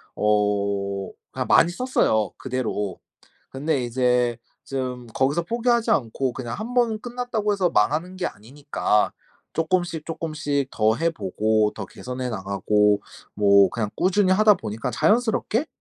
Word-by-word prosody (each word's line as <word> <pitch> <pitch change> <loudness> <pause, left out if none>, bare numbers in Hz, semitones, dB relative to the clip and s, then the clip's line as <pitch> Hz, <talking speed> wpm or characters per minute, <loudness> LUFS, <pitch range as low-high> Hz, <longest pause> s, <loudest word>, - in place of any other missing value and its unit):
어 100 -2 0 0.2
그냥 - - -3
많이 170 - +5
썼어요, 175 - +1
그대로. 110 -7 -3 0.5
근데 140 0 -1
이제 125 -1 +1 0.3
좀 125 -2 -4
거기서 140 +6 +1
포기하지 235 +4 +1
않고 130 0 0
그냥 120 -2 -5
1 225 +4 -5
번 235 -3 +2
끝났다고 240 -3 -2
해서 190 -3 +1
망하는 160 - +1
게 185 - -3
아니니까 130 -2 -1 0.4
쪼끔씩 165 -1 -1
쪼끔씩 155 -4 -2
더 110 0 +2
해 165 +6 +1
보고 110 - 0
더 100 - -5
개선해 125 +6 -6
나가고 105 0 +1 0.3
뭐 100 -2 +5
그냥 110 -1 -2
꾸준히 185 +1 +2
하다 210 +2 +6
보니까 110 - -4
자연스럽게 230 +3 +1
130 Hz, 285 characters per minute, -24 LUFS, -, 0.5 s, 하다